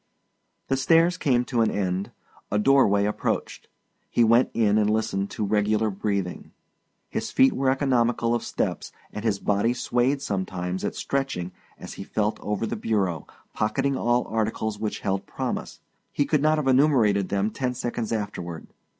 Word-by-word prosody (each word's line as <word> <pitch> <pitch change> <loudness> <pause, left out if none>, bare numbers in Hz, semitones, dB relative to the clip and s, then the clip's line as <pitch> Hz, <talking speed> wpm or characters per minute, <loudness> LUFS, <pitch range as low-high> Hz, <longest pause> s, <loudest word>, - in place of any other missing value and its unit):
The 135 - +1
stairs 165 +6 +4
came 125 -8 +1
to 120 -2 0
an 110 - +3
end, 95 -1 -2 0.4
a 105 - +2
doorway 105 -4 +4
approached; 105 - -2 0.4
he 120 - +3
went 115 +3 +4
in 110 -2 +2
and 105 -1 +2
listened 105 -2 0
to 105 - -3
regular 105 +1 +1
breathing. 100 -2 -3 0.5
His - - -3
feet 130 - +4
were 135 0 +1
economical 120 -4 +1
of 120 - 0
steps - - -3 0.2
and 105 - -5
his 110 -3 +1
body 105 +5 +1
swayed 125 +3 0
sometimes 95 -4 -3
at - - -2
stretching 135 -11 -2 0.3
as - - -9
he - - -7
felt 105 0 -1
over 105 +1 -2
the - - -3
bureau, 95 -7 -1 0.3
pocketing 135 +6 0
all 120 -1 +1
articles 110 -1 -2
which 105 -1 -3
held 95 -1 -2
promise - - -4 0.3
he 145 - +1
could 150 -1 +1
not 155 +1 +3
have 150 -3 -1
enumerated 125 -8 +3
them 100 +2 0
ten 125 -1 -2
seconds 120 -2 -3
afterward. 95 -7 -4
110 Hz, 160 wpm, -25 LUFS, 100-130 Hz, 0.5 s, stairs